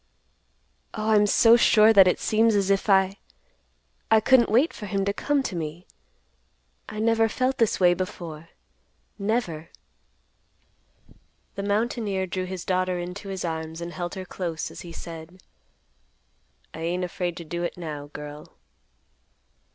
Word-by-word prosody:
"Oh, 215 +1 -1
I'm 210 -1 +5
so 230 +3 +6
sure 220 -1 +6
that 195 -3 +8
it 180 - +2
seems 220 0 +2
as 200 -1 +2
if 195 +2 0
I—I 65 - -1
couldn't 240 +2 +4
wait 250 +10 +3
for 210 - -8
him 195 -1 -1
to 200 - 0
come 285 +5 0
to 190 - -4
me. 165 +2 -5 1.0
I 215 - -8
never 225 0 +3
felt 255 +4 -1
this 230 -2 +2
way 180 -1 +5
before, 170 -3 -6 0.7
never." 200 -7 -2 1.8
The 200 - -5
mountaineer 205 -1 -1
drew 185 0 -3
his 185 -1 -6
daughter 185 -1 0
into 180 +3 -6
his 190 -2 -4
arms, 160 0 -4
and 170 0 -6
held 175 +1 -5
her 190 -1 -6
close, 170 -3 -4
as - - -9
he 170 - -9
said, 165 +2 -10 1.3
"I - - -8
ain't 175 +3 -2
afraid 175 -1 -3
to 170 - -6
do 170 +2 -5
it, 175 - -3
now, 150 -4 -6
girl." 150 0 -10
185 Hz, 145 wpm, -25 LUFS, 170-215 Hz, 1.8 s, that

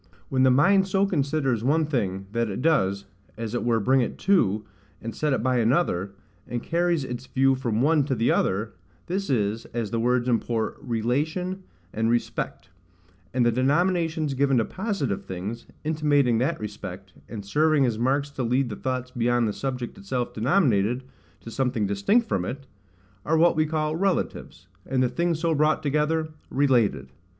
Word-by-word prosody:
When 130 -1 +1
the 130 - +6
mind 190 +9 +4
so 195 +1 +2
considers 140 - 0
one 155 +5 +2
thing, 100 -10 -2
that 115 0 0
it 100 +6 -4
does 100 -11 +2 0.3
as 115 -1 -4
it 120 - -1
were 115 -1 +2
bring 130 +5 +3
it 120 - -3
to, 110 - +2 0.3
and 115 0 -6
set 150 +3 0
it 135 - 0
by 130 0 +2
another, 110 - +1 0.3
and 120 -1 -4
carries 170 -2 +1
its 125 0 -6
view 135 0 +3
from 120 -3 -1
one 155 0 +4
to 135 -2 -1
the 115 +1 +2
other—this 110 - -2
is, 110 -3 0
as 115 -3 -2
the 115 - 0
words 125 +1 +1
import, 115 -1 -1
RELATION 150 - -1 0.3
and 110 +1 0
RESPECT; 115 -5 -2 0.6
and 125 0 +1
the 120 - +4
denominations 160 +3 +1
given 135 0 +2
to 115 - +2
positive 190 - -3
things, 100 +6 -6 0.2
intimating 145 -6 +2
that 140 +7 0
respect, 95 -3 -7 0.2
and 105 -3 -7
serving 150 +6 +3
as 115 -3 -1
marks 140 +4 +1
to 140 - -5
lead 125 +2 +1
the 105 - -5
thoughts 130 +1 -3
beyond 120 -1 +1
the 105 - -2
subject 130 -1 -4
itself 120 +5 -3
denominated, 125 - +2 0.4
to 115 - -9
something 125 -4 0
distinct 100 - +2
from 90 - 0
it, 135 +8 -5 0.6
are 160 +1 +1
what 170 +1 +4
we 155 0 +2
call 155 0 -1
RELATIVES; 180 - -2 0.2
and 130 -1 +1
the 125 - +2
things 170 +2 0
so 165 0 +1
brought 150 +1 +2
together, 155 +2 0 0.2
RELATED. 120 - +1
130 Hz, 170 wpm, -25 LUFS, 115-155 Hz, 0.6 s, the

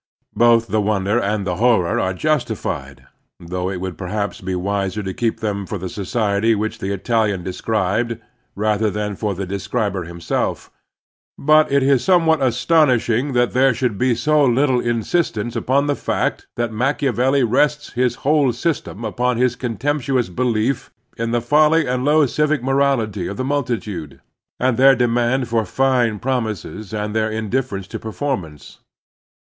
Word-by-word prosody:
Both 115 -1 +4
the 110 0 0
wonder 105 +1 +1
and 100 -2 -1
the 90 -2 -2
horror 110 -7 +2
are 95 - 0
justified, 70 - -2 0.2
— - - -54
^though 90 +2 -4
it 95 - -4
would 95 0 -6
perhaps 100 +2 -3
be 95 0 -3
wiser 100 +2 -2
to 95 -1 -4
keep 115 +1 -2
them 100 -3 -2
for 105 - -4
the 95 0 -5
society 105 +2 0
which 110 +1 -3
the 95 - -3
Italian 105 -2 0
described 110 +4 -1 0.4
rather 105 +1 +1
than 105 0 -3
for 105 0 -2
the 95 +2 -4
describer 100 0 -2
himself, 85 0 -3 0.4
— - - -31
^but 155 0 +4
it 140 -1 +3
is 135 -3 +3
somewhat 165 -4 +3
astonishing 130 -1 +2
that 120 -1 +2
there 130 -1 +3
should 120 -6 -1
be 125 -1 +2
so 150 +5 +2
little 130 0 +3
insistence 120 -1 -1
upon 140 +3 +1
the 145 0 0
fact - - -2
that 120 -1 -2
Machiavelli 135 +2 +1
rests 145 +5 +1
his 125 -1 +1
whole 145 -3 +3
system 135 - -3
upon 125 +3 0
his 125 0 +2
contemptuous 125 0 -1
belief 115 +5 -1 0.3
in 115 -1 -2
the 120 0 0
folly 155 +5 +3
and 125 0 -1
low 150 +1 +4
civic 150 0 0
morality 130 -8 +1
of 100 - -6
the - - -2
mtiltitude, 110 - -3 0.4
and 125 -2 +1
their 135 +1 +6
demand 120 +1 +1
for 115 -1 +1
fine 125 0 +1
promises 110 -4 -3
and 105 0 -3
their 110 0 +1
indifference 110 -2 -2
to - - -7
perform 120 0 -3
ance. 75 -3 -15
115 Hz, 160 wpm, -20 LUFS, 100-130 Hz, 0.4 s, their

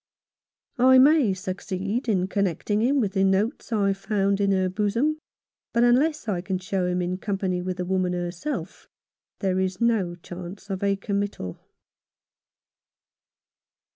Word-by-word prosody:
I 260 +1 +7
may 275 -4 +6
succeed 195 +5 -3
in 185 -3 +1
connecting 200 +1 0
him 270 +5 +3
with 205 -6 0
the 195 -2 +2
notes 200 +7 0
I 200 -3 +2
found 200 0 0
in 200 0 +2
her 190 -1 +2
bosom; 220 +11 0 0.5
but 235 0 +3
unless 275 +4 +3
I 185 -5 -1
can 190 +1 -2
show 185 0 -2
him 180 0 0
in 180 +1 -2
company 190 -3 -1
with 185 0 -3
the 180 - -2
woman 185 -1 0
herself, 175 - -4 0.5
there 190 -2 +1
is 185 0 -1
no 220 -7 +1
chance 180 +3 -9
of 190 - -3
a 200 0 +2
committal. 200 - -3
195 Hz, 140 wpm, -25 LUFS, 185-220 Hz, 0.5 s, I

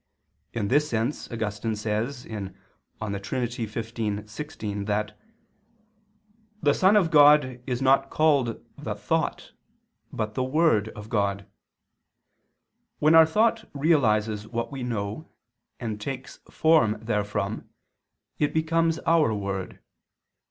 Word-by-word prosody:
In 105 -3 -2
this 150 +3 +3
sense 115 +6 -2
Augustine 110 -1 -2
says 110 +5 -2
(De - - -15 0.9
Trin. 120 +5 -2
xv, 110 -2 -4
16) 105 -5 -5
that 105 +1 -1 1.4
"the 145 -5 +3
Son 190 +6 +4
of 180 -6 +3
God 145 -4 +5
is 125 0 -2
not 135 +1 +4
called 140 -7 +2 0.2
the - - -4
Thought, - - -2 0.6
but 105 -1 -3
the 130 - -1
Word 130 -6 +2
of 105 0 -9
God. 100 -3 -1 1.5
When 155 +2 +4
our 160 -1 +8
thought 220 +5 +1
realizes 110 -8 +2
what 115 +3 -3
we 135 -2 -6
know 115 +4 -4 0.5
and 110 -4 -4
takes 130 +3 -6
form 155 -10 +3
therefrom, 105 -2 -2 0.7
it 150 0 0
becomes 165 +1 +2
our 165 -6 +4
word. 100 -2 -4
120 Hz, 115 wpm, -26 LUFS, 105-150 Hz, 1.5 s, our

